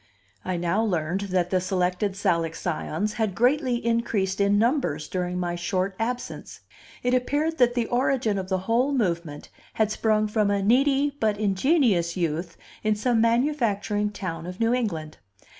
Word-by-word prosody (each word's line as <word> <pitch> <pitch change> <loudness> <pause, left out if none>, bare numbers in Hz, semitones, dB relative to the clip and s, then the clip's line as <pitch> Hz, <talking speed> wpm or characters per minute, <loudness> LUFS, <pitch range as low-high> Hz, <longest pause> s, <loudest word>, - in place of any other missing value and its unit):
I 185 -1 -2
now 175 +5 0
learned 180 -2 -1
that 180 -1 0
the 185 -1 +2
Selected 185 +2 0
Salic 170 -5 0
Scions 180 +4 -2
had 205 -4 0
greatly 255 +1 +2
increased 210 -5 0
in 200 +1 +3
numbers 230 - +1
during 180 +1 -2
my 175 -1 -2
short 185 +3 -2
absence. 245 +2 -4 0.4
It 245 0 +1
appeared 295 +6 0
that 245 -1 +4
the 240 -2 +1
origin 245 -4 +1
of 185 0 -6
the 190 - +1
whole 245 +6 +2
movement 170 - -2 0.2
had 220 -1 +1
sprung 215 -1 +1
from 210 -1 +1
a 200 -1 +1
needy 275 +5 +3
but 215 -2 +1
ingenious 200 - +2
youth 170 0 -2 0.2
in 215 0 +1
some 225 +1 +1
manufacturing 230 -4 +1
town 175 -5 -5
of 180 +1 -7
New 230 +1 +2
England. 165 -11 -3
205 Hz, 160 wpm, -25 LUFS, 180-240 Hz, 0.4 s, that